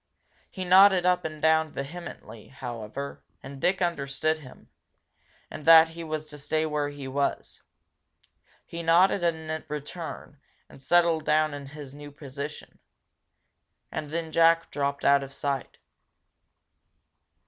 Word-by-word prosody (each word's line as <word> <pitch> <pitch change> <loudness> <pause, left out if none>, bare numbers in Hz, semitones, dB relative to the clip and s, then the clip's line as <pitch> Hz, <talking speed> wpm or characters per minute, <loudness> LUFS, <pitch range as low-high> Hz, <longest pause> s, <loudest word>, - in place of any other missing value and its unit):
He 185 -2 -6
nodded 190 0 +6
up 180 -1 +2
and 155 -1 -5
down 160 0 +3
vehemently, 140 -7 -8
however, 120 +1 -7 0.2
and 135 0 -9
Dick 185 +1 +1
understood 155 -1 -1
him, 130 -4 -15 0.8
and - - -8
that 165 0 +8
he 165 +1 -8
was 155 -1 -4
to 150 -1 -11
stay 155 +2 -1
where 150 -2 -1
he 145 -2 -8
was. 140 +1 -2 1.0
He 170 - -7
nodded 175 +4 +4
in 160 -2 -2
return, 150 0 -7 0.3
and - - -15
settled 170 +1 +3
down 155 0 +2
in 140 -1 -7
his 145 -1 -10
new 145 0 -10
position. 145 +1 -8 1.1
And 150 - -5
then 160 +1 -4
Jack 165 +1 +4
dropped 140 -1 -2
out 140 0 +5
of 135 0 -8
sight. 140 -2 -4
155 Hz, 130 wpm, -27 LUFS, 140-165 Hz, 1.1 s, that